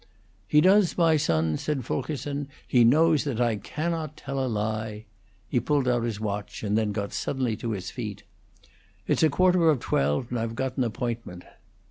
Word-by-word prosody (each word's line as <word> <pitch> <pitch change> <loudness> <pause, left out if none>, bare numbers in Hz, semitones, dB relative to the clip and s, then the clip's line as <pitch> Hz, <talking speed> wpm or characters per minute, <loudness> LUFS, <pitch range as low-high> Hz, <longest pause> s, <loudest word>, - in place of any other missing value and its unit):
"He 150 +8 +5
does, 190 +1 +4
my 165 -2 +4
son," 80 - +1
said 140 -5 -2
Fulkerson. 145 +1 -3 0.2
"He 120 -2 +4
knows 155 +5 +4
that 135 -6 -3
I 120 -3 +2
cannot 155 - -4
tell 135 0 -3
a - - -1
lie." 110 0 -3 0.4
He 125 - +1
pulled 145 0 0
out 120 -1 +2
his 110 -3 -3
watch, 105 0 -4
and 105 0 0
then 110 -1 +1
got 100 -1 -4
suddenly 130 -4 -1
upon 110 +1 -3
his 95 -2 -5
feet. 105 -5 -6 0.8
"It's - - +1
quarter 180 +1 +4
of 150 -5 +3
twelve, 75 - 0
and 120 - -1
I've 115 0 -3
got 130 +1 -2
an 130 - +1
appointment." 115 -6 -4
120 Hz, 175 wpm, -26 LUFS, 110-145 Hz, 0.8 s, He